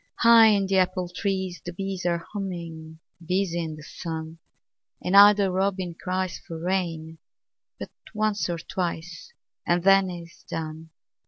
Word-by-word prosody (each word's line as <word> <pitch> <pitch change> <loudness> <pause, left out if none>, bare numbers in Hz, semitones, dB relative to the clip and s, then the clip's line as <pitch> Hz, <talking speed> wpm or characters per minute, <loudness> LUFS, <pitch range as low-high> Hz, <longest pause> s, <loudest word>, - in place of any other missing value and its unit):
High 230 -1 +7
in 205 -2 +3
the 190 0 +1
apple 185 -1 0
trees 190 -2 -3
the 175 - -6
bees 190 -1 -4
Are 170 -1 -1
humming, 170 -5 -6 0.3
busy 175 -1 -1
in 160 -1 -5
the 155 - -12
sun, 160 0 -7 0.6
An 180 - -3
idle 200 0 +7
robin 185 -1 -1
cries 185 +1 -3
for 165 -1 -8
rain 165 -3 -2 0.6
But - - -7 0.2
once 215 -3 -1
or 170 - -2
twice 170 - -5 0.3
and 175 0 +1
then 195 0 +5
is 170 -1 -10
done. 160 0 -6
180 Hz, 145 wpm, -25 LUFS, 165-195 Hz, 0.6 s, High